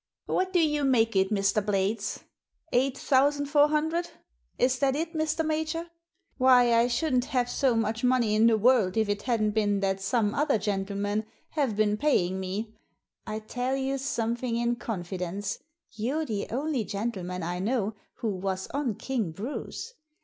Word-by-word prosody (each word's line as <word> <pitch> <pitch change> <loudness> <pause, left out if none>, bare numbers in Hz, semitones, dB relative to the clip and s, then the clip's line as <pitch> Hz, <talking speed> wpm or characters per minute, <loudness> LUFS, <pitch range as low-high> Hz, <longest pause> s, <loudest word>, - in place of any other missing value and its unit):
"What 370 0 0
do 370 - +2
you 300 -3 +2
make 230 -5 +3
it, 190 0 +3
Mr. 205 0 +1
Blades? 200 +1 -1 0.5
Eight 260 +2 +2
thousand 285 +1 +2
four 290 +1 +4
hundred. 315 +3 0 0.5
Is 255 0 +2
that 270 0 +2
it, 325 +3 -2
Mr. 315 0 0
Major? 315 +2 -2 0.5
Why, 250 -2 +6
I 230 +1 +4
shouldn't 250 0 +1
have 250 -2 0
so 250 0 +1
much 225 +1 -1
money 250 -4 +3
in 220 +2 +5
the 225 -1 +4
world 220 -4 +3
if 220 -1 +2
it 205 0 -1
hadn't 225 -4 +1
been 205 -2 +1
that 195 0 0
some 210 +1 +1
other 295 -5 +2
gentlemen 205 +1 -2 0.2
have 275 -8 0
been 210 0 +2
paying 190 -10 +1
me. 200 +4 -4 0.5
I 215 - -3
tell 245 +4 -2
you 270 0 -1
something 235 -2 -1
in 235 0 0
confidence. 190 -1 -4 0.3
You're 255 +8 -2
the 210 -6 -3
only 270 0 -1
gentleman 195 -3 -4
I 175 +2 -3
know 215 +1 0 0.2
who 225 - -2
was 190 -1 -2
on 275 -6 -1
King 230 -9 -2
Bruce. 250 - -6
230 Hz, 165 wpm, -28 LUFS, 205-270 Hz, 0.5 s, Why